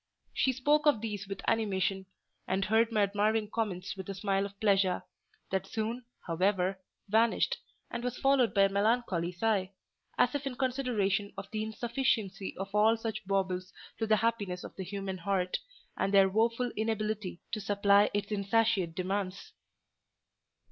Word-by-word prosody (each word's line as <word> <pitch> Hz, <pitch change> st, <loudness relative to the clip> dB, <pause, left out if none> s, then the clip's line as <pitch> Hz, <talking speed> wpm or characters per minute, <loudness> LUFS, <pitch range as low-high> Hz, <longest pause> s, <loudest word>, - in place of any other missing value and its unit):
She 265 Hz, -, +2 dB
spoke 295 Hz, +4 st, +2 dB
of 290 Hz, -7 st, +5 dB
these 210 Hz, -2 st, -4 dB
with 195 Hz, -, -7 dB
animation, 195 Hz, -3 st, 0 dB, 0.4 s
and 190 Hz, +1 st, 0 dB
heard 225 Hz, +2 st, +3 dB
my 215 Hz, -2 st, +3 dB
admiring 210 Hz, +2 st, +1 dB
comments 195 Hz, -5 st, -2 dB
with 190 Hz, 0 st, -7 dB
a 195 Hz, -, -3 dB
smile 195 Hz, 0 st, 0 dB
of 200 Hz, 0 st, -18 dB
pleasure: 195 Hz, -3 st, +2 dB, 0.5 s
that 190 Hz, 0 st, -1 dB
soon, 230 Hz, +4 st, -3 dB, 0.2 s
however, 185 Hz, +2 st, +1 dB, 0.3 s
vanished, 220 Hz, +3 st, +2 dB, 0.3 s
and 235 Hz, -, -4 dB
was 250 Hz, 0 st, -2 dB
followed 270 Hz, -3 st, +3 dB
by 200 Hz, -, +4 dB
a 195 Hz, -, +4 dB
melancholy 200 Hz, -4 st, +1 dB
sigh; 195 Hz, 0 st, 0 dB, 0.4 s
as 250 Hz, -, +3 dB
if 285 Hz, -1 st, -2 dB
in 255 Hz, -, -4 dB
consideration 240 Hz, -7 st, 0 dB
of 195 Hz, 0 st, -7 dB
the 215 Hz, -, -2 dB
insufficiency 220 Hz, -3 st, -1 dB
of 195 Hz, +1 st, -5 dB
all 215 Hz, +2 st, +4 dB
such 225 Hz, -4 st, -5 dB
baubles 185 Hz, -1 st, -1 dB, 0.3 s
to 225 Hz, -, 0 dB
the 215 Hz, -, +5 dB
happiness 210 Hz, -5 st, -1 dB
of -, -, -9 dB
the 190 Hz, -, -5 dB
human 195 Hz, 0 st, -4 dB
heart, 185 Hz, 0 st, 0 dB, 0.4 s
and 195 Hz, -, 0 dB
their 195 Hz, -1 st, +6 dB
woeful 230 Hz, +4 st, +1 dB
inability 215 Hz, -4 st, -2 dB
to 215 Hz, -, -2 dB
supply 200 Hz, 0 st, +4 dB
its 205 Hz, +1 st, -2 dB
insatiate 200 Hz, -4 st, +1 dB
demands. 190 Hz, -, -3 dB
205 Hz, 155 wpm, -31 LUFS, 195-225 Hz, 0.5 s, their